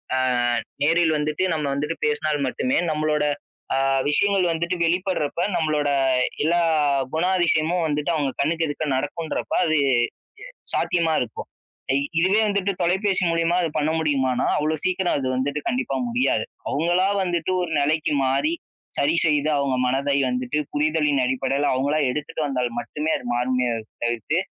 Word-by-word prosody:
அ - - +1 0.7
நேரில் 165 +1 +3
வந்துட்டு 150 +3 -1
நம்ம 155 -2 -2
வந்துட்டு 150 +4 -2
பேசினால் 150 0 0
மட்டுமே 255 - 0
நம்மளோட 150 -1 0 0.5
அ - - +1 0.3
விஷயங்கள் 195 +4 +2
வந்துட்டு 170 +2 -1
வெளிப்படுறப்ப, 175 -3 -1 0.2
நம்மளோட 150 -2 +1 0.5
எல்லா 170 +3 +2 0.5
குணாதிசயமும் 175 -1 +1
வந்துட்டு 150 +1 -1
அவங்க 145 -3 0
கண்ணுக்கு 165 +3 +1
எதுக்க 145 +1 -3
நடக்குன்றப்ப 145 +4 -3
அது 155 -1 +2 0.2
எ - - +4 0.8
சாத்தியமா 165 -2 +1
இருக்கும். 120 -3 -5 0.5
ஐ - - +2 0.2
இதுவே 190 +5 +3
வந்துட்டு 200 -1 0
தொலைபேசி 190 +2 +1
மூலியமா 165 +1 +1
அது 165 - 0
பண்ண 150 +1 +1
முடியுமானா, 135 -5 +1
அவ்ளோ 155 +1 0
சீக்கிரம் 185 -2 +1
அது 130 - -2
வந்துட்டு 140 +3 -1
கண்டிப்பா 250 +1 -1
முடியாது. 250 - +1 0.2
அவங்களா 175 +5 +1 0.2
வந்துட்டு 175 0 -1
ஒரு 175 -2 -3
நிலைக்கு 150 +1 +1
மாறி, 140 +4 +1 0.5
சரி 150 +4 +2
செய்து 150 -1 +2
அவங்க 140 -2 0
மனதை 140 +2 +1
வந்துட்டு, 125 +3 -1 0.2
புரிதலின் 150 -2 +2
அடிப்படையில 135 +2 0
அவங்களா 140 +4 +1
எடுத்துட்டு 150 +3 -4
வந்தால் 125 -3 -1
மட்டுமே 150 +7 -3
அது - - -9
மாறும்னே 125 0 0 0.3
தவிர்த்து. 120 +7 0
155 Hz, 140 wpm, -23 LUFS, 140-170 Hz, 0.8 s, எ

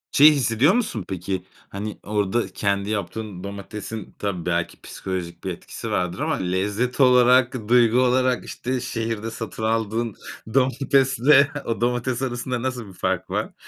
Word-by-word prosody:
Şeyi 150 +2 +8
hissediyor 135 - +3
musun 165 - -1
peki? 95 0 -3 0.3
Hani 105 +2 -5
orada 105 +2 0
kendi 100 0 -1
yaptığın 105 -2 -4
domatesin 100 +2 -7
tabii 95 -5 -3
belki 85 -1 -1
psikolojik 90 -3 -6
bir 95 - -2
etkisi 85 - -7
vardır 90 +1 -1
ama, - - 0
lezzet 100 +8 -1
olarak 125 -2 +5
duygu 120 0 +5
olarak 130 0 +2
işte 130 +1 -3
şehirde 115 -2 -3
satın 110 0 -6
aldığın 115 0 0 0.4
domatesle 135 +1 +4
o 115 - -2
domates 120 +1 0
arasında 125 -1 -2
nasıl 125 -3 -3
bir 95 - -12
fark 90 - -2
var? - - -2
115 Hz, 140 wpm, -23 LUFS, 100-125 Hz, 0.4 s, Şeyi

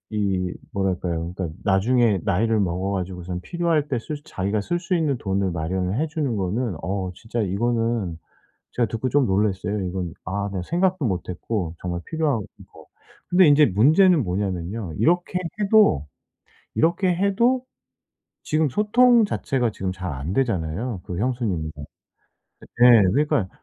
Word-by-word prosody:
이 95 -3 0 0.2
뭐랄까요. 90 -3 -2
그러니까 85 -4 -4
나중에 110 +2 +3
나이를 110 +4 +2
먹어 95 0 -1
가지고선 90 -2 -4
필요할 170 - 0
때 130 - 0
쓸 150 +6 -6
자기가 100 +3 -2
쓸 175 +12 -1
수 180 +1 -3
있는 155 -6 +1
돈을 95 -3 -1
마련을 90 +4 -2
해 160 - 0
주는 150 -6 -2
거는 100 +3 -1
어 95 +1 -2
진짜 115 +4 -5
이거는 115 -3 -1 0.5
제가 120 - +1
듣고 115 +4 -2
좀 140 -1 +3
놀랐어요 100 +1 0
이건. 90 -2 -4
아 100 +3 -2
내가 95 -2 -3
생각도 180 - 0
못했고 90 -1 -3
정말 85 -1 -4
필요한 155 -6 0 0.3
거. - - -16 0.4
근데 180 0 +5
인제 145 +1 +6
문제는 155 - +4
뭐냐하면요. 95 0 -3
이렇게 175 +2 +2 0.2
해도 200 - +4 0.7
이렇게 175 +3 +2
해도 215 +7 +2 0.8
지금 155 0 +1
소통 230 - +4
자체가 130 - -1
지금 95 -2 -3
잘 90 -2 -5
안 70 +6 -4
되잖아요 105 -3 -1
그 90 - -5
형수님이랑. 105 -10 -1 1.1
예예 120 -3 +8
그러니까 145 -8 +1
105 Hz, 315 characters per minute, -23 LUFS, 90-150 Hz, 1.1 s, 예예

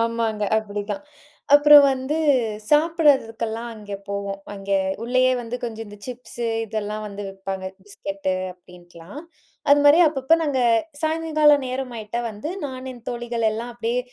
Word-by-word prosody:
ஆமாங்க. 230 -2 -1
அப்படி 205 -1 -3
தான். 295 - -3 0.5
அப்புறம் 290 0 +9
வந்து 265 +3 -2 0.5
சாப்பிடறதுக்கெல்லாம் 265 -8 +2
அங்க 205 -2 -8
போவோம். 200 0 -4
அங்கே 195 0 -1 0.3
உள்ளயே 255 +1 +3
வந்து 240 +1 -5
கொஞ்சம் 225 -1 -5
இந்த 205 - -11
சிப்ஸு 245 -1 -6 0.2
இதெல்லாம் 215 0 -4
வந்து 205 0 -7
விப்பாங்க. 195 0 -6 0.2
பிஸ்கெட்டு 195 -1 -4 0.2
அப்டின்ட்டுலாம். 175 - -14 0.5
அதுமாரி 290 +2 +6
அப்பப்போ 275 +1 +2
நாங்க, 285 -4 0 0.4
சாயங்கால 310 -2 +3
நேரம் 255 0 -4
ஆயிட்டா 220 +2 -4
வந்து, 215 +9 -6
நான் 260 -1 -6
என் 240 -2 -15
தோழிகள் 240 -1 -2
எல்லாம் 230 +3 -5
அப்படியே 235 +1 -1
235 Hz, 130 wpm, -23 LUFS, 205-270 Hz, 0.5 s, அப்புறம்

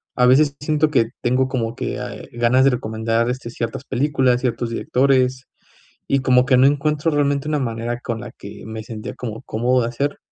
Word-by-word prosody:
a 125 - +3
veces 140 +3 +4
siento 150 +1 +1
que 115 -6 +2
tengo 130 +2 +2
como 120 -3 -2
que, - - -4
ah, - - -5
eh, - - -11
ganas 120 +2 +3
de 135 - +5
recomendar, 115 0 -1
este, 125 -2 -4
ciertas 115 +2 -4
películas, 130 -2 +1
ciertos 120 -2 -2
directores, 130 +1 +1 0.6
y 140 -1 +1
como 125 -1 +4
que 130 -3 +4
no 130 - +6
encuentro 150 +2 +1
realmente 145 -1 0
una 150 -1 0
manera 120 -1 -3
con 115 -2 -4
la 120 -1 -8
que 100 - -11
me 110 0 -6
sentía 110 -1 -7
como 115 -3 -7
cómodo 125 +3 +1
de 115 - -1
hacer. 140 +4 -2
125 Hz, 200 wpm, -21 LUFS, 115-140 Hz, 0.6 s, no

